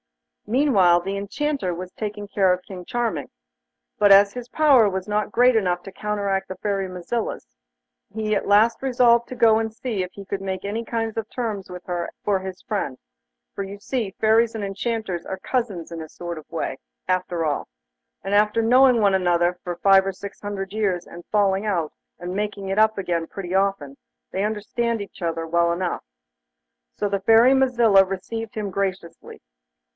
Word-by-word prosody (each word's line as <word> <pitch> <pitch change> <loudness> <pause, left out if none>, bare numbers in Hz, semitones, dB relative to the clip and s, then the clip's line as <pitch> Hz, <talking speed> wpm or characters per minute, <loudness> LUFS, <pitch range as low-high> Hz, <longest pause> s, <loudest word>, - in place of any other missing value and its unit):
Meanwhile, 210 -9 +4
the 195 +3 -3
Enchanter 205 +1 -2
was 180 +1 -7
taking 205 -1 -5
care 195 -2 +2
of 180 0 -1
King 185 -3 -9
Charming, 240 +4 -2 0.7
but 205 -1 +5
as 200 +1 +7
his 245 -1 -7
power 270 -7 +5
was 190 0 -4
not 210 0 -1
great 245 +2 +4
enough 180 -5 +1
to 195 - -10
counteract 200 -2 -2
the 190 - -6
Fairy 195 -2 -2
Mazilla's, 185 - -4 0.7
he 215 0 -1
at - - -2
last 210 +3 +4
resolved 240 -3 +3
to 255 - -6
go 225 -2 +5
and 220 0 -2
see 225 -4 -3
if 180 - -7
he 200 - -10
could 195 0 -4
make 190 0 -4
any 215 +3 -2
kind 225 -1 -3
of 220 -1 -3
terms 220 -6 -4
with 180 0 -9
her 175 -1 -3 0.2
for 200 -2 +2
his 190 -1 -7
friend; 195 - -3 0.6
for 200 - -4
you 195 +1 -8
see, 215 -3 -3
Fairies 225 +1 +3
and 215 - -3
Enchanters 200 -2 -3
are 190 - -4
cousins 200 -7 -3
in 165 -1 -6
a 160 - -8
sort 175 -1 -6
of 155 - -16
way, - - -3 0.3
after 180 -2 0
all; 145 -2 -2 0.5
and 195 - -3
after 210 +2 +3
knowing 250 +1 +5
one 200 -2 +3
another 175 -1 +2
for 175 -3 -4
five 195 0 +5
or 195 - -1
six 200 +1 -10
hundred 200 -1 -5
years 195 -5 0
and 175 0 -11
falling 200 -1 +2
out, 175 -7 -1 0.3
and 180 +1 -5
making 205 -1 -3
it 195 +2 0
up 220 0 +4
again 170 -4 -1
pretty 185 -2 -6
often, 190 -8 0 0.4
they 190 - -1
understand 220 +2 -1
one 200 - -5
another 165 -1 -2
well 170 +1 +2
enough. 175 +1 -2 0.9
So 205 - 0
the 200 -1 -1
Fairy 225 +5 +6
Mazilla 240 -7 +5
received 210 +4 -5
him 210 -2 -3
graciously. 190 -3 -4
200 Hz, 185 wpm, -23 LUFS, 185-220 Hz, 0.9 s, as